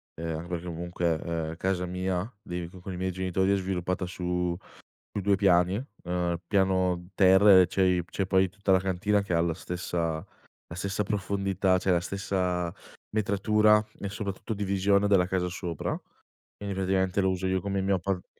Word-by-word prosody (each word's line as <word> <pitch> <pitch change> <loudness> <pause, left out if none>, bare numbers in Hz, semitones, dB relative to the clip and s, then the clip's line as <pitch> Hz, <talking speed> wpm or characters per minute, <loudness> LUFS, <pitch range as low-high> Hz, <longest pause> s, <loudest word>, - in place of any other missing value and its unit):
ehm, 80 0 -4
anche 85 +2 -7
perché 85 0 -4
comunque, 85 -1 -2
ehm, 80 -1 -3
casa 90 0 -1
mia, 90 +4 -2
dei 90 -3 -4
co 90 +1 -13
con 95 +1 -7
i - - -6
miei 95 0 -1
genitori 95 +1 0
è 100 - +4
sviluppata 90 -1 -2
su 90 -1 -2 0.6
su 100 - -4
2 100 0 +3
piani, 95 +2 +3 0.2
ehm, 90 -1 -1
piano 95 -2 +1
terra 95 0 +7
e 90 - +5
c'è 95 - 0
i 90 -2 +2
c'è 95 +2 -3
poi 95 0 +3
tutta 100 0 0
la 95 - +6
cantina 95 +2 +1
che 100 - -5
ha 85 - +3
la 85 -1 +1
stessa 85 -2 -3 0.5
la 85 - -6
stessa 100 +3 -1
profondità, 100 -2 0
cioè 90 0 +2
la 85 - +2
stessa 90 -1 -2 0.4
metratura 105 +1 +3 0.2
e 100 - -4
soprattutto 100 0 -5
divisione 100 0 +2
della 95 -3 +4
casa 90 -1 -1
sopra. 85 -2 -4 0.6
Quindi 100 -1 -4
praticamente 95 0 +1
lo 95 - +2
uso 95 0 -2
io 95 -1 0
come 100 0 -2
mio 95 0 +2
appart 95 0 -2
95 Hz, 180 wpm, -28 LUFS, 90-100 Hz, 0.6 s, terra